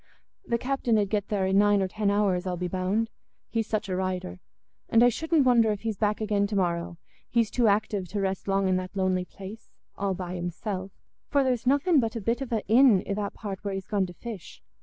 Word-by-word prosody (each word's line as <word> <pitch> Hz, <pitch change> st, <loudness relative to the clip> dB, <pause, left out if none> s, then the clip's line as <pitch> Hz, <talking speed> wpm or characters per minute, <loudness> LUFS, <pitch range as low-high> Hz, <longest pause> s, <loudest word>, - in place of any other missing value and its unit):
The 235 Hz, -, +1 dB
captain 250 Hz, -2 st, 0 dB
'ud 205 Hz, -2 st, +1 dB
get 205 Hz, -2 st, 0 dB
there 200 Hz, -3 st, 0 dB
in 190 Hz, +1 st, +3 dB
nine 205 Hz, 0 st, +4 dB
or 190 Hz, -, +1 dB
ten 205 Hz, +2 st, -1 dB
hours, 195 Hz, -3 st, +1 dB
I'll 180 Hz, -1 st, -2 dB
be 180 Hz, +1 st, -2 dB
bound, 190 Hz, +5 st, -1 dB, 0.4 s
he's 225 Hz, -2 st, -1 dB
such 215 Hz, -2 st, -2 dB
a 185 Hz, -, -2 dB
rider. 180 Hz, -, -3 dB, 0.5 s
And 230 Hz, +1 st, +5 dB
I 245 Hz, -, +7 dB
shouldn't 320 Hz, +3 st, +1 dB
wonder 235 Hz, -3 st, +5 dB
if 205 Hz, -, -3 dB
he's 220 Hz, -3 st, -3 dB
back 210 Hz, -1 st, +1 dB
again 205 Hz, -2 st, +1 dB
to 205 Hz, -, -4 dB
morrow; 175 Hz, -2 st, -1 dB, 0.3 s
he's 230 Hz, -3 st, +1 dB
too 240 Hz, -2 st, +2 dB
active 205 Hz, -2 st, +1 dB
to 205 Hz, +4 st, -3 dB
rest 195 Hz, 0 st, -2 dB
long 195 Hz, 0 st, +2 dB
in 185 Hz, -1 st, +2 dB
that 185 Hz, +1 st, -5 dB
lonely 185 Hz, -1 st, +1 dB
place, 200 Hz, +4 st, -11 dB, 0.3 s
all 195 Hz, -1 st, -1 dB
by 180 Hz, -1 st, -5 dB
himself, 185 Hz, +2 st, -4 dB, 0.4 s
for 280 Hz, -1 st, +3 dB
there's 250 Hz, -2 st, 0 dB
nothing 285 Hz, +4 st, +4 dB
but 225 Hz, -1 st, -1 dB
a -, -, -2 dB
bit 230 Hz, +5 st, -1 dB
of 265 Hz, -, -5 dB
a 225 Hz, -2 st, -1 dB
inn 225 Hz, -3 st, +6 dB
i' -, -, -1 dB
that 200 Hz, 0 st, -3 dB
part 195 Hz, -3 st, -6 dB
where 200 Hz, -1 st, -2 dB
he's 195 Hz, -1 st, -5 dB
gone 200 Hz, -3 st, 0 dB
to 175 Hz, -, -10 dB
fish. 220 Hz, -6 st, -9 dB
205 Hz, 230 wpm, -27 LUFS, 190-225 Hz, 0.5 s, I